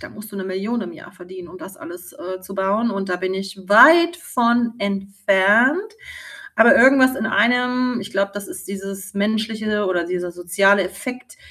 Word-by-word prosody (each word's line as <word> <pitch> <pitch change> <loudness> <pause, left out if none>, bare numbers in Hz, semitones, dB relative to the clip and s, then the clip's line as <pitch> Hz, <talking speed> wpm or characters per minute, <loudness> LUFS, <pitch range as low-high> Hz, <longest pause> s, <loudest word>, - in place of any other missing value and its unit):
da 320 - -10
musst 210 -4 -13
du - - -8
'ne 190 - -5
1.000.000 195 +6 -4
im 180 -4 -7
Jahr - - -15
verdienen, 180 0 -12
um 185 - -13
das 190 +1 -12
alles, 175 +1 -12
äh, 185 +1 -8
zu 190 +1 -11
bauen 205 +5 0
und 195 -1 -5
da 180 - -1
bin 185 +1 -4
ich 195 +1 -6
weit 335 +10 +6
von 235 -6 0
entfernt. 200 - +1 0.6
Aber 225 +1 +6
irgendwas 260 -1 +5
in 220 - -3
einem, 250 +1 0
ich 205 - -9
glaube, 200 0 -2
das 205 -1 -7
ist - - -10
dieses 195 0 -8
menschliche 215 0 -2
oder 175 -2 -1
dieser 180 0 -5
soziale 195 +3 +2
Effekt, 205 - -8
200 Hz, 185 wpm, -19 LUFS, 190-235 Hz, 0.6 s, weit